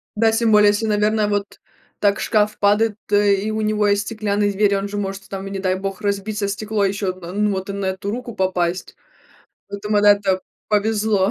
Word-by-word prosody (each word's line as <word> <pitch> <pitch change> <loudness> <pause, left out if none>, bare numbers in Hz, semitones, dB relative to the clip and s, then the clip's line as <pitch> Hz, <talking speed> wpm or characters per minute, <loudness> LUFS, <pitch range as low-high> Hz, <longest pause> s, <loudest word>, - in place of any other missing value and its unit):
Да, 225 +1 +3
тем 225 0 +1
более, 210 -1 +6
если, 210 +2 0
наверное, 210 0 +1
вот 205 -1 -3 0.4
так 200 -1 +2
шкаф 210 -1 +1
падает, 210 +1 +3
то, 205 - +1
э, 205 -1 +4
и 210 +3 -3
у 220 0 -2
него 215 -1 +1
есть 205 0 +2
стеклянные 205 -1 -1
двери, 200 0 +2
он 195 +1 -2
же 205 0 -5
может, 195 -1 -4
там, 195 0 -6
и - - -7
не 195 - -4
дай 185 -1 0
бог, 195 +1 -5
разбиться 205 0 -2
стекло, 210 +1 -2
ещё 195 0 -1
од 185 0 -6
ну, 210 0 +1
вот 190 0 -4
и - - -3
на 200 -1 -3
эту 190 +2 -3
руку 240 0 -5
попасть. 185 -1 -1 0.7
Поэтому 210 +1 -1
она 205 0 +7
это 195 -2 0 0.3
повезло, 210 -1 +1
205 Hz, 210 wpm, -20 LUFS, 195-210 Hz, 0.7 s, она